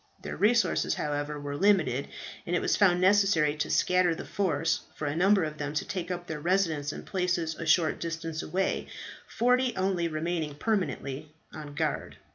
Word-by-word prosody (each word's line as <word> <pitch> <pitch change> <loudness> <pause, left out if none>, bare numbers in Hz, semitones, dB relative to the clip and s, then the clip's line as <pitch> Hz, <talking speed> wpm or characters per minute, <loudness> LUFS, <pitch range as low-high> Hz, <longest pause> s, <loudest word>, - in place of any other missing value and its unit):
Their - - -5
resources, 230 +3 +2
however, 145 0 -3
were 145 0 -5
limited, 155 -8 +2 0.4
and 175 - 0
it - - +2
was - - +1
found 180 -4 +4
necessary 185 -5 +4
to 150 - -2
scatter 180 -2 +3
the - - -7
force, 165 -4 0
and - - -28
for 155 - -4
a 145 +1 -1
number 195 +2 +4
of 155 -1 -4
them 145 +1 -4
to - - -1
take 185 -4 -4
up 175 -1 -4
their 160 -3 -5
residence 165 -4 0
in - - -8
places 180 -4 -1
a 165 +1 -7
short 160 -1 +3
distance 165 -1 -4
away, 190 +1 -1 0.4
forty 250 +1 +2
only 185 -2 0
remaining 160 -1 -2
permanently 155 -7 -2 0.2
on 150 -2 -8
guard. 155 -1 -2
170 Hz, 180 wpm, -28 LUFS, 150-190 Hz, 0.4 s, found